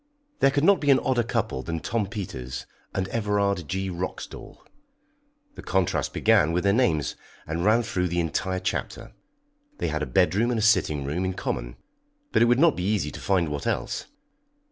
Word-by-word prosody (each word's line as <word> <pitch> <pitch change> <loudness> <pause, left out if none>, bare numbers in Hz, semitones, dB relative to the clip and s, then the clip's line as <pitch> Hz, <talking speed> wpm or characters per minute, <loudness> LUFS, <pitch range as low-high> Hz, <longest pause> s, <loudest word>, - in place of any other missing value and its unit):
There 135 - +5
could 140 +1 0
not 200 +2 +5
be 145 - 0
an 135 - +7
odder 130 -2 +1
couple 110 - -2
than 80 +3 -4
Tom 105 +3 -1
Peters 90 - -6 0.3
and 95 -1 -2
Everard 100 -5 0
G. 95 0 -2
Roxdal 90 +1 -6 1.0
the - - -10
contrast 95 -2 0
began 75 +2 +3
with 90 - 0
their 100 0 +3
names, 85 - +1 0.3
and 80 +2 -3
ran 110 +4 +4
through 90 -5 -1
the 85 0 -1
entire 95 +3 -1
chapter. - - -4 0.6
They - - -1
had - - -2
a - - -2
bedroom 100 +5 +2
and 120 - 0
a 110 - 0
sitting 75 -10 +3
room 80 +7 -2
in 95 0 -2
common, - - -3 0.6
but - - +3
it - - +7
would 120 +1 +4
not 160 +2 +5
be 90 - -3
easy 95 -7 0
to - - -8
find 90 -5 +1
what 75 -1 -4
else. - - -2
95 Hz, 190 wpm, -25 LUFS, 85-115 Hz, 1.0 s, an